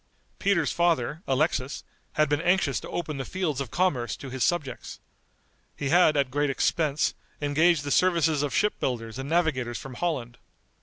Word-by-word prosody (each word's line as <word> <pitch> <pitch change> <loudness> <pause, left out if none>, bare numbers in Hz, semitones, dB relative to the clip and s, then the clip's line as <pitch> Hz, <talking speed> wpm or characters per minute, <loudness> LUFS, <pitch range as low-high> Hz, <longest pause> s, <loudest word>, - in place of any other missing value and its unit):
Peter's 190 -6 +2
father, 165 -3 +1
Alexis, 135 -1 0 0.3
had 155 0 +3
been 145 +2 0
anxious 175 -5 +2
to - - -9
open 155 -4 -3
the 135 - -3
fields 155 -3 -2
of 135 - -4
commerce 130 - 0
to 135 - -9
his 130 -1 -1
subjects. 145 -8 -2 0.8
He 140 - -3
had, 160 -2 +5
at 135 -2 +1
great 145 +1 +1
expense, 150 +1 +1 0.3
engaged 150 +2 +3
the 145 - -4
services 165 -5 +3
of 145 -2 -1
ship 210 - +1
builders 115 -1 -3
and 135 +1 -5
navigators 150 -8 0
from 135 - -8
Holland. 125 -5 -3
145 Hz, 165 wpm, -26 LUFS, 135-170 Hz, 0.8 s, had